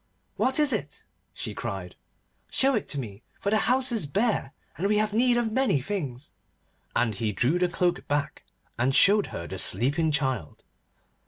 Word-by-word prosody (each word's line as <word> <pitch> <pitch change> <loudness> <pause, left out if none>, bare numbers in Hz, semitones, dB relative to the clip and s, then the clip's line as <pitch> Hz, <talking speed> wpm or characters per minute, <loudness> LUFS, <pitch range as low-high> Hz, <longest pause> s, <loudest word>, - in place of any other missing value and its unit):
'What 260 +3 +1
is 295 -3 +4
it?' 145 -9 -4 0.3
she - - -6
cried. 95 -2 -5 0.5
'Show 270 +1 +3
it 220 - -1
to 145 - -3
me, 105 -5 -7 0.2
for 200 - -1
the 215 - +4
house 255 0 +3
is 220 -10 +1
bare, 205 - 0 0.2
and 185 +6 -1
we 210 +1 +2
have 215 0 +1
need 240 +2 +3
of 235 -2 0
many 260 - +2
things.' 140 -4 -5 0.6
And 115 -2 +2
he 105 +2 -2
drew 125 - +1
the 180 0 +2
cloak 175 0 -1
back, 145 0 -2 0.4
and 130 +3 +2
showed 205 +1 +5
her 85 - -6
the 95 +1 -6
sleeping 145 +7 +1
child. 130 - -2
165 Hz, 175 wpm, -26 LUFS, -, 0.6 s, showed